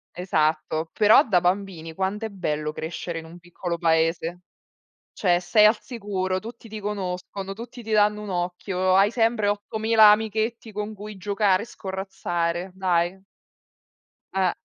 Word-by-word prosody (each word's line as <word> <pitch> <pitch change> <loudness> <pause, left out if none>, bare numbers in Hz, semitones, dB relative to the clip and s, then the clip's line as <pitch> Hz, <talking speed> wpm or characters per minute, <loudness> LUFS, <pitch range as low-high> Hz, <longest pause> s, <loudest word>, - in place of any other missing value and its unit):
Esatto, 155 -2 0
però 215 +7 +6
da 180 -5 +3
bambini 180 -3 -1
quant'è 195 +5 -2
bello 150 -6 -2
crescere 165 +2 -5
in 160 - -10
un 165 +2 -12
piccolo 175 0 -5
paese, 165 +1 +1 0.7
cioè 175 -3 +2
sei 210 +4 +5
al 215 +1 +4
sicuro, 195 -5 -3
tutti 230 +2 -10
ti 215 0 -7
conoscono, 195 -1 -4
tutti 235 +3 -9
ti 220 - -8
danno 210 0 +3
un 210 - -6
occhio, 180 +1 -1
hai 200 +2 +5
sempre 225 -3 +1
8000 215 +1 +4
amichetti 220 +1 0
con 210 +1 -4
cui 210 0 -9
giocare 200 0 +1
e - - -15
scorrazzare, 190 -4 -3
dai. 180 0 0 1.1
Eh. 190 -2 +2
190 Hz, 140 wpm, -24 LUFS, 175-210 Hz, 1.1 s, però